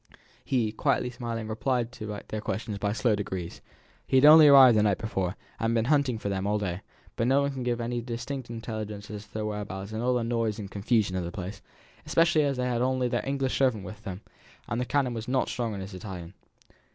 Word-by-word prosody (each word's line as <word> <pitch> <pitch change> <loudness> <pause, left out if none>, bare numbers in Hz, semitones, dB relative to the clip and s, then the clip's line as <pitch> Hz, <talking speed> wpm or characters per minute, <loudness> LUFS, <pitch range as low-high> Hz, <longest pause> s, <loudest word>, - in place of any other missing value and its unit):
He, 120 -5 0
quietly 125 +3 0
smiling, 115 -2 -4
replied 115 +2 -1
to 105 -4 -6
their 110 - -4
questions 105 -1 -4
by 100 0 0
slow 115 +1 +1
degrees. 95 -4 -5 0.5
He 130 - +3
had 130 - +6
only 155 0 +10
arrived 135 -4 +9
the 105 - +4
night 105 -2 +2
before, 95 -4 -2 0.2
and 115 - 0
had - - +1
been 115 -1 +2
hunting 140 -5 +2
for 110 - -5
them 100 0 -1
all 105 +1 +1
day; 95 -3 -3 0.3
but 115 - 0
no 135 +2 +4
one 140 - 0
could 130 -2 -5
give 120 -1 -1
him - - -2
any 120 0 -2
distinct 125 +2 -5
intelligence 110 -3 -6
as 105 0 -7
to 95 - -29
their 110 -1 -2
whereabouts 105 -1 -5
in 110 +1 -3
all 125 +1 +2
the 120 - 0
noise 115 -2 -1
and 100 -2 -7
confusion 105 -2 +1
of 90 - -1
the 85 - -5
place, 95 +2 -6 0.4
especially 165 -2 +3
as 140 -3 0
they 125 - 0
had 125 -2 0
their - - +3
only 130 -1 0 0.2
English 135 -1 -1
servant 125 -7 +2
with 105 0 -9
them, 100 -2 -7 0.5
and 120 0 -2
the - - -1
canon 130 0 +1
was 115 -1 -5
not 130 +1 +1
strong 115 -4 -2
in 100 - -5
his 95 +1 -8
Italian. 90 -2 -8
115 Hz, 235 wpm, -28 LUFS, 105-125 Hz, 0.5 s, only